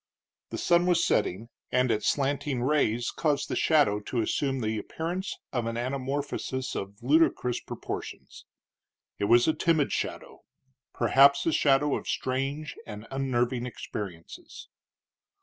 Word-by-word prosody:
The - - -5
sun 175 +1 +3
was 175 -1 +3
setting, 110 +6 0 0.2
and 125 -1 +2
its 110 -1 0
slanting 140 -2 0
rays 125 -4 +1
caused 150 -3 0
the - - -1
shadow 145 -11 +3
to 115 +3 -2
assume 135 +4 -1
the 110 -1 -1
appearance 175 - -4 0.2
of 120 -3 -1
an 115 - -3
anamorphosis 130 +1 -3
of 100 +3 -6
ludicrous 135 -3 +2
proportions. - - -7 0.7
It 100 - +1
was 120 +3 +5
a 160 - +4
timid 160 -4 +1
shadow - - -4 0.5
perhaps 140 +4 +5
a 165 - +2
shadow 145 -1 +3
of - - -6
strange 135 +4 -2
and 105 +1 -8
unnerving 125 -2 0
experiences. 95 -8 -8
130 Hz, 130 wpm, -28 LUFS, 120-145 Hz, 0.7 s, was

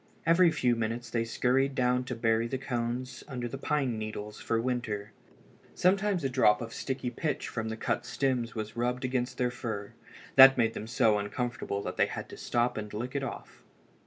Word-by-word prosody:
Every 170 +1 +6
few 125 -7 +2
minutes 115 +1 -3
they 115 -1 +1
scurried 130 +4 +1
down 125 -1 +2
to 125 - -4
bury 115 0 +1
the 130 - -2
cones 125 0 -3
under 125 -4 -4
the 135 +3 -6
pine 135 -7 0
needles 105 -1 -6
for 115 - 0
the 115 - -1
winter. 110 -5 -2 0.6
Sometimes 190 -1 +2
a - - +2
drop 125 -5 +4
of 115 -1 -6
sticky 130 -2 -3
pitch 150 +3 -2
from 110 -1 -3
the 110 - -4
cut 115 0 -1
stems 125 -1 -1
was 110 0 -5
rubbed 125 +2 -1
against 125 -1 -1
their 125 -1 +1
fur. 110 -5 -5 0.4
That 135 0 +10
made 115 -2 +2
them 110 - -6
so 110 -2 +3
uncomfortable 100 -1 -3
that - - -5
they - - +4
had - - -6
to - - -9
stop 120 0 0
and 105 -1 -6
lick 120 +4 -4
it 140 - 0
off. 135 - -7
120 Hz, 195 wpm, -30 LUFS, 115-130 Hz, 0.6 s, That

